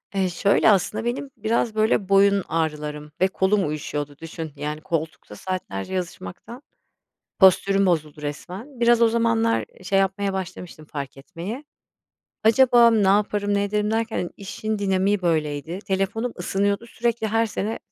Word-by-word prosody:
Eee, 190 -2 +1
şöyle 200 +5 +3
aslında 210 +3 +1
benim 265 +3 -2
biraz 220 +1 0
böyle 215 -2 +1
boyun 200 -1 +4
ağrılarım 150 -2 -3
ve 190 - +5
kolum 190 -1 +1
uyuşuyordu 145 -1 -4
düşün 165 -1 -7
yani 150 +2 -4
koltukta 160 -10 -4
saatlerce 185 - -5
yazışmaktan 185 - -6 0.8
postürüm 195 +1 +5
bozuldu 155 -4 -1
resmen. 190 - -7
Biraz 235 0 +4
o 230 - +6
zamanlar 230 0 +1 0.2
şey 195 +1 +1
yapmaya 195 +1 0
başlamıştım 180 -4 -6
fark 140 -2 -6
etmeye. 185 - -7 0.8
Acaba 235 0 +6
ne 210 -4 +3
yaparım 205 0 +2
ne 200 - +1
ederim 210 +1 0
derken 225 0 -1
hani 175 - -3
işin 215 +2 -4
dinamiği 195 0 +1
böyleydi. 155 0 -1
Telefonum 200 +5 -1
ısınıyordu, 200 +4 0
sürekli 235 -1 -1
her 225 +1 +1
sene 215 +1 -3
195 Hz, 140 wpm, -23 LUFS, 165-220 Hz, 0.8 s, o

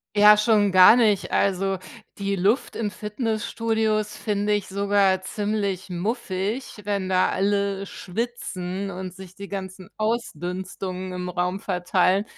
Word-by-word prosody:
Ja, 210 +1 +8
schon 210 -2 +3
gar 185 +4 +9
nicht. 215 -5 +2
Also 195 0 +1 0.4
die 200 0 -1
Luft 200 +8 +1
in 215 -2 -1
Fitnessstudios 220 0 -1
finde 210 -1 0
ich 205 -2 -1
sogar 200 -1 +2
ziemlich 200 -1 -2
muffig, 205 +4 -3
wenn 200 -2 -2
da 185 -1 +3
alle 200 0 0
schwitzen 195 -3 -4
und 185 -1 -6
sich 185 -1 -12
die 200 0 -8
ganzen 190 -1 -7
Ausdünstungen 185 -3 -3
im 180 0 -4
Raum 180 +2 -1
verteilen. 185 +2 +1
200 Hz, 125 wpm, -24 LUFS, 185-210 Hz, 0.4 s, gar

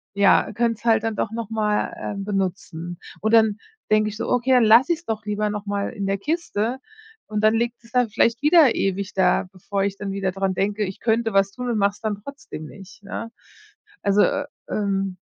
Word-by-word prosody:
ja, 200 +1 +4
könnte 230 0 0
es - - -22
halt 225 -1 +3
dann 225 -1 -1
doch 220 - -2
noch 230 -1 -5
mal, 210 -1 0
ähm, 200 -1 -4
benutzen. 180 -3 -3 0.2
Und 220 +1 0
dann 220 -2 +5 0.3
denke 215 0 +4
ich 210 - -8
so: - - -3
„Okay, 250 +1 +1
dann 250 - +6
lasse 235 +9 +6
ich 325 - -5
es - - -35
doch 220 -1 -3
lieber 210 0 -1
noch 210 0 -5
mal 200 0 -2
in 200 -5 -4
der 195 0 0
Kiste.“ 260 - -2 0.5
Und 215 0 -2
dann 215 +1 +5
liegt 235 +1 -2
es 230 - -19
dann 250 -3 +3
vielleicht 230 +3 +2
wieder 300 -5 +6
ewig 195 0 -1
da, 190 0 +2
bevor 195 +2 -3
ich 200 0 -2
dann 200 -1 -4
wieder 195 -1 -1
dran 195 0 -1
denke, 205 +3 0
ich 190 -1 -5
könnte 225 0 +1
was 195 0 +3
tun 250 +3 -5
und 230 - 0
mache 200 0 +3
es 205 - -18
dann 215 -2 -1
trotzdem 275 - -9
nicht, 195 +3 -14
ne? 230 +3 -6 0.7
Also, 200 +1 +4 0.5
ähm 195 -2 -1
210 Hz, 215 wpm, -23 LUFS, 195-230 Hz, 0.7 s, dann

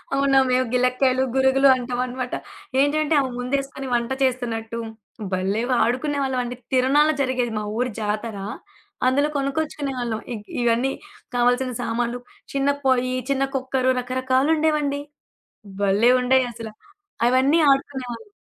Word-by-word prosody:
అవునా! 275 -1 +4
మేవు 255 +1 +2
గిలక్కాయలు, 255 +1 +2
గురుగులు 265 +1 +4
అంటవనమాట. 250 0 -3 0.4
ఏంటంటే 295 +2 +2
అవి 260 - -2
ముందేసుకొని, 270 +1 -3
వంట 240 +1 0
చేస్తున్నట్టు, 235 -3 -1 0.5
భలేవాడుకునేవాళ్ళవండి. 245 +6 0 0.2
తిరనాల 275 +4 +4
జరిగేది, 255 -3 0
మా - - -4
ఊరి 250 +1 0
జాతర. 210 0 -3 0.7
అందులో 285 +3 +2
కొనుక్కొచ్చుకునేవాళ్ళం. 275 -5 -2
ఇగ్ 210 -2 -8 0.2
ఇవన్నీ 240 +3 +2 0.4
కావాల్సిన 245 +1 +2
సామాన్లు, 240 +1 -2 0.3
చిన్న 275 0 +1 0.2
పొయ్యి, 255 -1 +2 0.2
చిన్న 275 0 +2
కుక్కరు, 260 0 +1
రకరకాలుండేవండి. 280 +4 +1 0.8
భలే 205 +5 +4
ఉండేయసల. 245 -3 +1 0.6
అవన్నీ 265 +6 +3
ఆడుకునేవాళ్ళం. 265 - -3
255 Hz, 100 wpm, -23 LUFS, 245-275 Hz, 0.8 s, అవునా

